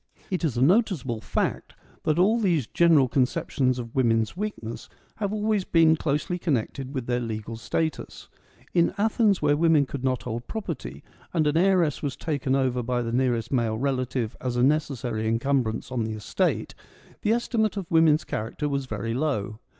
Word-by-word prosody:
It 185 -2 -1
is 140 -7 0
a 125 - +3
noticeable 155 - +2
fact - - -2 0.3
that 155 0 +2
all 210 +6 +4
these 175 - +1
general 160 -1 +4
con 125 +1 +3
ceptions 130 0 -1
of 115 -2 -6
women's 115 -3 +1
weakness 185 - -5 0.3
have 205 -2 -2
always 215 -1 0
been 165 -2 +4
closely 150 +3 -1
connected 135 -2 -2
with 130 -3 -2
their 120 0 0
legal 115 -1 -5
status. 160 +7 -3 0.5
In 170 -1 +2
Athens, 210 -3 +2
where 145 -1 +4
women 160 -2 +4
could 135 -1 -6
not 130 -2 0
hold 120 0 -5
property, 150 - -5 0.3
and 160 -2 +3
an 150 +1 +1
heiress 175 -4 +3
was 145 -3 -3
taken 140 -4 -1
over 130 -2 +1
by 120 0 -1
the 115 - -3
nearest 120 -3 0
male 115 -4 +1
relative 125 -3 -1
as 125 -1 -2
a 120 - +3
necessary 130 -6 0
encumbrance 115 0 0
on 125 -3 -1
the 110 0 -3
estate, 105 -1 -1 0.5
the 210 - +1
estimate 225 -2 0
of 190 -1 -5
woman's 160 -2 +4
character 115 +8 -3
was 140 -2 -2
very 115 -2 -3
low. 115 -6 -2
135 Hz, 175 wpm, -26 LUFS, 120-165 Hz, 0.5 s, all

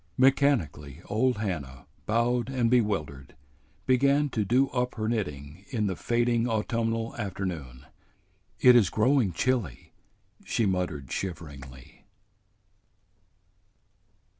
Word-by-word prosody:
Mechanically 110 - +1
old 120 +3 +1
Hannah, 80 - -5 0.2
bowed 120 +2 +1
and 125 -3 0
bewildered, 90 - -1 0.5
began 140 +3 +3
to 110 -4 -1
do 125 +7 +3
up 125 -1 -2
her 110 -1 -2
knitting 80 -7 -4
in 110 -4 -1
the 95 -2 -1
fading 120 +3 +1
autumnal 115 +1 -1
afternoon. 90 -11 -5 0.7
"It 125 -1 +7
is 110 -7 +5
growing 115 -1 +2
chilly," 115 - -2 0.5
she 115 - 0
muttered 90 -8 -2
shiveringly. 70 -8 -7
110 Hz, 100 wpm, -27 LUFS, 80-120 Hz, 0.7 s, It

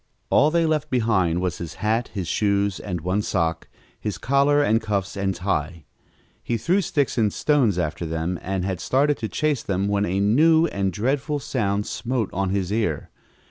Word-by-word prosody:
All 145 - +5
they 170 +1 +2
left 155 -1 0
behind 105 -9 +1
was 90 -1 -2
his 85 -2 -6
hat, 110 +3 0
his 95 -5 -4
shoes 100 0 +1
and 90 -5 -4
one 90 +5 0
sock, 85 -5 -1 0.3
his 105 -4 -3
collar 140 +5 +3
and 115 -4 +2
cuffs 100 -3 -2
and 95 -1 -1
tie. 85 -3 -2 0.6
He 120 - -1
threw 175 - +1
sticks 145 -7 0
and 105 -2 +2
stones 130 - +2
after 85 0 -2
them 80 +2 -2
and 95 -1 -2
had 95 -3 -2
started 140 +9 +1
to 110 - -4
chase 150 -4 0
them 100 0 -1
when 100 0 +1
a 95 +3 0
new 160 +11 +4
and 100 - -1
dreadful 135 - -1
sound 105 -7 -1
smote 120 -2 -2
on 95 +1 -1
his 95 0 -1
ear. 105 -9 -1
105 Hz, 180 wpm, -23 LUFS, 95-130 Hz, 0.6 s, All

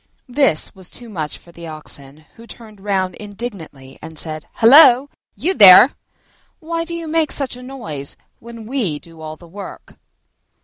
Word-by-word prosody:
This 250 - +1
was 185 -2 -12
too 240 -1 -11
much 155 -7 -5
for 170 - -19
the 170 0 -11
Oxen, 155 -1 -9
who 230 +1 -15
turned 215 -4 -14
round 190 -2 -1
indignantly 195 - -9
and 160 -1 -10
said, 155 -1 -4
"Hullo, 265 +2 +7 0.2
you 360 +5 -1
there! 200 - +9 0.7
Why 330 +1 -4
do 340 0 -5
you 335 -1 -6
make 315 0 0
such 270 -4 -1
a 250 - -11
noise 195 - -7 0.2
when 230 -1 -11
we 220 - -1
do 165 +1 -15
all 155 0 -7
the 170 +2 -17
work?" 195 +4 -11
205 Hz, 165 wpm, -18 LUFS, 160-260 Hz, 0.7 s, there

